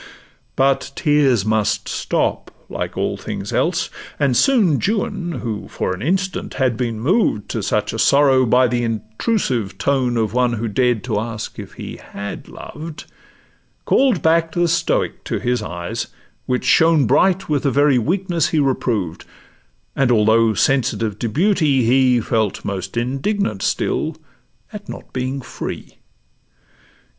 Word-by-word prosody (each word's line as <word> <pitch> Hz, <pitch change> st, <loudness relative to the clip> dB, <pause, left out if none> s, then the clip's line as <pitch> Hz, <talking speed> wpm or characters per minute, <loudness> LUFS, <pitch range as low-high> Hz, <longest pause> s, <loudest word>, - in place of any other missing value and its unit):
But 135 Hz, 0 st, +1 dB
tears 140 Hz, -, +2 dB
must 110 Hz, -1 st, 0 dB
stop -, -, -1 dB, 0.2 s
like -, -, -4 dB
all -, -, -1 dB
things -, -, -6 dB
else; -, -, 0 dB, 0.3 s
and 140 Hz, -4 st, +2 dB
soon 210 Hz, -, +3 dB
Juan, 195 Hz, -4 st, -1 dB
who 110 Hz, -3 st, -4 dB
for -, -, -2 dB
an 90 Hz, -, -7 dB
instant 190 Hz, +5 st, -1 dB
had 130 Hz, -4 st, +1 dB
been 115 Hz, -2 st, -2 dB
moved 135 Hz, -, +1 dB
To -, -, -2 dB
such -, -, -1 dB
a -, -, -4 dB
sorrow 135 Hz, -2 st, +4 dB
by 125 Hz, +2 st, +4 dB
the 120 Hz, 0 st, -1 dB
intrusive 115 Hz, -, -2 dB
tone 130 Hz, -4 st, +1 dB
Of 110 Hz, -2 st, 0 dB
one 125 Hz, -1 st, +2 dB
who 115 Hz, 0 st, -2 dB
dared 120 Hz, +1 st, +1 dB
to 110 Hz, -5 st, -1 dB
ask 110 Hz, -1 st, -5 dB
if -, -, -9 dB
'he -, -, -8 dB
had 100 Hz, 0 st, -8 dB
loved,' 155 Hz, +1 st, -9 dB, 0.8 s
Call'd 255 Hz, -, +3 dB
back 165 Hz, 0 st, +2 dB
the 175 Hz, 0 st, +2 dB
stoic 165 Hz, 0 st, 0 dB
to -, -, -2 dB
his 125 Hz, -1 st, -1 dB
eyes, 85 Hz, -4 st, -4 dB, 0.4 s
which 125 Hz, 0 st, -1 dB
shone 160 Hz, +2 st, +4 dB
Bright 190 Hz, -, +2 dB
with 150 Hz, -2 st, +1 dB
the 140 Hz, -, +1 dB
very 140 Hz, -2 st, +4 dB
weakness 170 Hz, -, 0 dB
he 160 Hz, -, -1 dB
reproved; 120 Hz, -, -1 dB, 0.7 s
And 135 Hz, -2 st, +2 dB
although 110 Hz, 0 st, +4 dB
sensitive 115 Hz, -5 st, +1 dB
to 120 Hz, -, -1 dB
beauty, 155 Hz, -, +2 dB
he 125 Hz, 0 st, +4 dB
Felt 110 Hz, -3 st, -1 dB
most 95 Hz, +2 st, -4 dB
indignant 130 Hz, -, -1 dB
still -, -, -1 dB, 0.6 s
at -, -, -9 dB
not -, -, -9 dB
being 130 Hz, +2 st, -2 dB
free. -, -, -7 dB
130 Hz, 145 wpm, -20 LUFS, 115-155 Hz, 0.8 s, sorrow